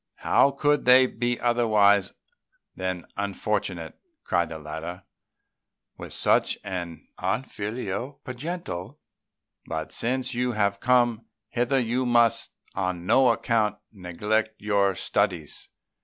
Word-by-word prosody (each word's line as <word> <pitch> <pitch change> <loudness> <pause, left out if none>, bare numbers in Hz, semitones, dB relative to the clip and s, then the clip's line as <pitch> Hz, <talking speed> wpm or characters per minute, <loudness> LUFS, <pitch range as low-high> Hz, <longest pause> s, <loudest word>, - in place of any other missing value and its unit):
"How 140 - +4
could 145 +1 +1
they 130 +1 +8
be 120 0 -2
otherwise 105 -5 +3 0.6
than 95 -2 -3
unfortunate," 100 -3 -2 0.2
cried 85 -2 +1
the 80 - -6
latter, 80 +4 -7 0.9
"with - - -9
such - - +2
an 90 -4 -6
unfilial 115 +1 -3
progenitor? 130 - -5 0.7
But 80 -1 -4
since 130 +2 -1
you 125 0 0
have 100 -2 +1
come 120 -2 +2 0.2
hither, 125 +3 +1
you 125 +1 0
must 120 -2 +3 0.2
on 90 -2 -2
no 130 +6 +5
account 115 -2 +1
neglect 105 +3 -2
your 100 -2 +2
studies." 80 -3 -1
110 Hz, 110 wpm, -26 LUFS, 95-120 Hz, 0.9 s, they